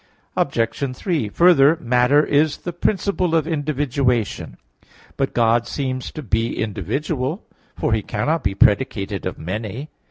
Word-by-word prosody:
Obj. 125 +3 -1
3: 155 - -1
Further, 160 - +5
matter 125 +3 +3
is 150 +1 +2
the 175 - -6
principle 185 -1 0
of 160 -2 +2
individualization. 140 - -1 0.6
But 135 - -2
God 115 0 +3
seems 130 0 -3
to 155 - -6
be 115 0 -1
individual, 130 - -2 0.3
for - - 0
He 110 - +1
cannot 150 +12 -1
be 95 0 -1
predicated 100 -3 +1
of 95 - -5
many. 110 - -5
130 Hz, 130 wpm, -21 LUFS, 110-155 Hz, 0.6 s, Further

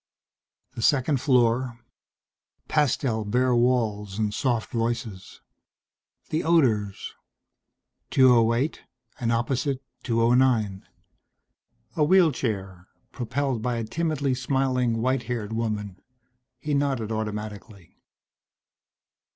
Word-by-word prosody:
The - - -6
second 135 +1 +2
floor. 125 -2 +2 0.9
Pastel 130 -6 +1
bare 125 +5 +1
walls 110 -5 0
and 105 -2 -1
soft 120 -3 -1
voices. 115 -5 -4 0.9
The 155 - 0
odors. 115 - +1 1.0
208 125 +2 +3 0.4
and 115 -1 0
opposite, 130 +3 0 0.2
209. 115 -4 +2 1.1
A 155 - +3
wheelchair, 115 - +1 0.2
propelled 130 0 -2
by 120 +1 -1
a 115 - -2
timidly 145 +2 -1
smiling 125 -3 0
white 130 -1 0
haired 110 -3 -3
woman. 105 -4 -3 0.6
He 150 +4 -3
nodded 135 -6 0
automatically. 105 -3 -6
120 Hz, 85 wpm, -25 LUFS, 110-130 Hz, 1.1 s, 208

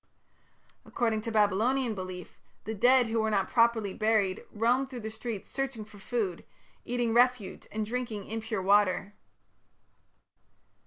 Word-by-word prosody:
According 225 -2 -1
to 230 - -4
Babylonian 220 +4 +2
belief, 185 -3 -8 0.2
the 220 - -4
dead 245 +4 +5
who 225 0 -1
were 220 - 0
not 200 -3 +1
properly 230 -4 +2
buried 215 -3 +1
roamed 245 +5 +1
through 250 -3 -7
the 220 0 -5
streets 220 -2 -6
searching 265 -5 -4
for 205 -1 -15
food, 195 -4 -2 0.4
eating 240 -1 -1
refuse 245 -4 +2
and 215 0 -2
drinking 230 -3 -4
impure 220 -2 -4
water. 200 0 +3
220 Hz, 135 wpm, -29 LUFS, 205-240 Hz, 0.4 s, dead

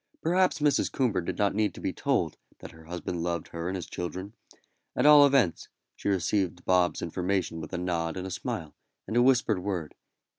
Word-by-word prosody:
Perhaps 185 +2 +3
Mrs. 150 -1 +2
Coomber 115 -9 0
did - - -4
not 100 -1 +2
need 105 -2 0
to - - -9
be - - -2
told - - 0 0.2
that - - -10
her 80 0 -16
husband 85 0 -4
loved 85 -1 -2
her 85 0 -5
and 95 - -3
his 90 -3 -4
children; 95 +4 -6 0.6
at - - +1
all 150 -1 +9
events, 135 -11 +2 0.3
she - - -3
received 95 -1 0
Bob's 90 -1 +2
information 90 0 -2
with - - -8
a 90 - -3
nod 85 -1 -2
and 90 - -4
a 95 - -5
smile, 90 - -4 0.3
and 110 - -5
a 120 - +5
whispered 120 -5 +3
word. 90 -5 -3
95 Hz, 195 wpm, -28 LUFS, 85-110 Hz, 0.6 s, all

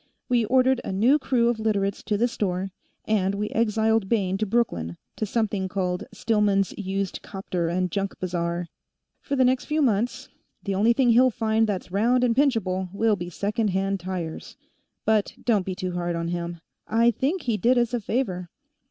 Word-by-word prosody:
We 240 -2 +2
ordered 255 +2 +3
a - - -4
new 235 +10 +4
crew 240 -4 +2
of 235 -2 -1
Literates 200 -3 0
to 210 - 0
the 235 +3 +3
store, 190 -4 -2 0.3
and 200 -2 +1
we 210 +1 -2
exiled 220 -2 +1
Bayne 195 -5 +1
to 215 - 0
Brooklyn, 85 - 0 0.2
to 215 - -2
something 205 -3 -1
called 180 -2 -2
Stillman's 210 -3 +1
Used 195 -1 -3
Copter 185 -3 -3
and 180 +1 -1
Junk 195 +1 -2
Bazaar. 175 -1 -2 0.5
For 280 - -2
the 260 -1 +4
next 255 0 +2
few 305 0 -1
months, 240 -4 0 0.3
the 200 - -2
only 215 +5 +4
thing 245 -1 +3
he'll 255 +3 +6
find 220 -1 +1
that's 190 -3 -3
round 235 +6 +2
and 235 -2 +2
pinchable 200 -10 +1
will 215 +2 +2
be 175 -2 -6
second 210 +5 -1
hand 195 0 0
tires. 175 -3 -5 0.5
But 215 -2 +2
don't 210 -6 +1
be 185 - -2
too 185 -1 -3
hard 175 -1 -2
on 170 0 -2
him; 170 -1 -4 0.3
I 230 +1 +4
think 285 - -1
he 235 -3 0
did 245 +4 +3
us 240 0 +1
a 245 - +1
favor." 195 -6 -2
205 Hz, 185 wpm, -25 LUFS, 185-235 Hz, 0.5 s, he'll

